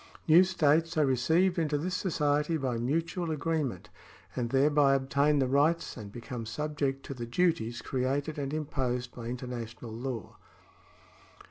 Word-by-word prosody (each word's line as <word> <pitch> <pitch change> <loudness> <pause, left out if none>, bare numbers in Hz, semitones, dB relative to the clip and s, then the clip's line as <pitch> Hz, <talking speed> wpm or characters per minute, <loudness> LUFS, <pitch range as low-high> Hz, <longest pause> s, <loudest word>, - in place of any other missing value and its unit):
New 165 +3 +8
states 165 -3 +2
are 155 - +4
re 135 - +2
ceived 170 +8 +2
into 150 -2 +1
this 180 +5 -3
society 150 -3 +1
by 130 -4 -1
mutual 165 +7 -1
agreement, 155 - -2 0.5
and 120 -2 -1
thereby 140 +1 +4
obtain 140 +2 +2
the 135 - +3
rights 145 +6 +2
and 105 -4 -8
become 120 0 -6
subject 140 +1 -2
to - - -5
the 120 -3 -6
duties 120 -5 0
created 140 +4 -1
and 140 -1 -3
imposed 130 -5 -2
by 120 - -8
international 120 -2 -6
law. 115 -2 -5
140 Hz, 145 wpm, -30 LUFS, 125-155 Hz, 0.5 s, New